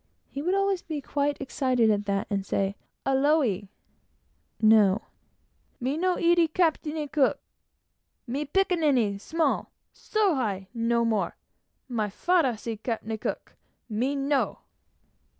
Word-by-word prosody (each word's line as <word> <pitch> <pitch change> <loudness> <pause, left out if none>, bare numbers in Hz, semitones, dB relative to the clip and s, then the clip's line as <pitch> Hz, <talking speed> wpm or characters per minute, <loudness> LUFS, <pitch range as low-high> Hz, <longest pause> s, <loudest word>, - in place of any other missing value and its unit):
He 275 - -4
would 360 +5 +1
always 395 -2 +1
be 310 -2 -4
quite 285 +1 -1
excited 255 -4 +1
at 205 -1 0
that; 200 0 0
and 200 -1 0
say 195 0 -1 0.3
"Aole!" 270 - +2 0.9
(no.) 215 -2 +5 0.8
"Me 260 +3 -1
no 360 +2 +1
eat 340 -2 +3
Captain 315 -3 +1
Cook! 280 -2 +2 0.9
Me 270 +4 -2
pikinini 290 - +1
small 325 +6 0 0.2
so 425 -4 +1
high 200 -8 -2
no 235 0 +1
more! 220 -3 0 0.5
My 220 -5 -1
father 290 - +1
see 225 +1 -5
Captain 225 0 -3
Cook! - - -5 0.4
Me 250 +7 0
no!" 275 0 0
265 Hz, 120 wpm, -27 LUFS, 220-315 Hz, 0.9 s, no